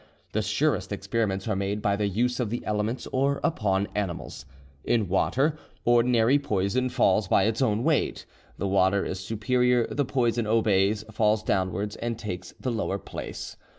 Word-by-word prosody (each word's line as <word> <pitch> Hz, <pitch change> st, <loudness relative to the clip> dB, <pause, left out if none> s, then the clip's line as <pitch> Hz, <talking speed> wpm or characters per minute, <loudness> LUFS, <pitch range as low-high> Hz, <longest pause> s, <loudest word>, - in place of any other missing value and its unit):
The 110 Hz, -, 0 dB
surest 110 Hz, +2 st, 0 dB
experiments 100 Hz, 0 st, -2 dB
are 110 Hz, -, 0 dB
made 100 Hz, +2 st, -1 dB
by 100 Hz, -1 st, +1 dB
the 105 Hz, 0 st, 0 dB
use 120 Hz, +6 st, 0 dB
of 120 Hz, -4 st, 0 dB
the 120 Hz, -, -4 dB
elements 105 Hz, +4 st, -1 dB
or 140 Hz, +2 st, +1 dB
upon 100 Hz, -, +1 dB
animals. 90 Hz, -9 st, -4 dB, 0.4 s
In 110 Hz, -4 st, +1 dB
water, 135 Hz, -, +1 dB, 0.3 s
ordinary 120 Hz, +2 st, +4 dB
poison 125 Hz, 0 st, 0 dB
falls 115 Hz, -5 st, +2 dB
by 95 Hz, -, +4 dB
its 110 Hz, +3 st, 0 dB
own 110 Hz, -3 st, +1 dB
weight. -, -, 0 dB, 0.3 s
The 100 Hz, -, -2 dB
water 95 Hz, 0 st, +2 dB
is 95 Hz, -, -4 dB
superior, 120 Hz, +4 st, +1 dB
the 145 Hz, -, -1 dB
poison 120 Hz, -4 st, 0 dB
obeys, 105 Hz, -2 st, +2 dB
falls 105 Hz, 0 st, +2 dB
downwards, 100 Hz, +2 st, -1 dB
and 115 Hz, -1 st, -3 dB
takes 105 Hz, -5 st, -6 dB
the 130 Hz, -, -2 dB
lower 110 Hz, -4 st, -1 dB
place. -, -, -7 dB
110 Hz, 160 wpm, -26 LUFS, 100-120 Hz, 0.4 s, ordinary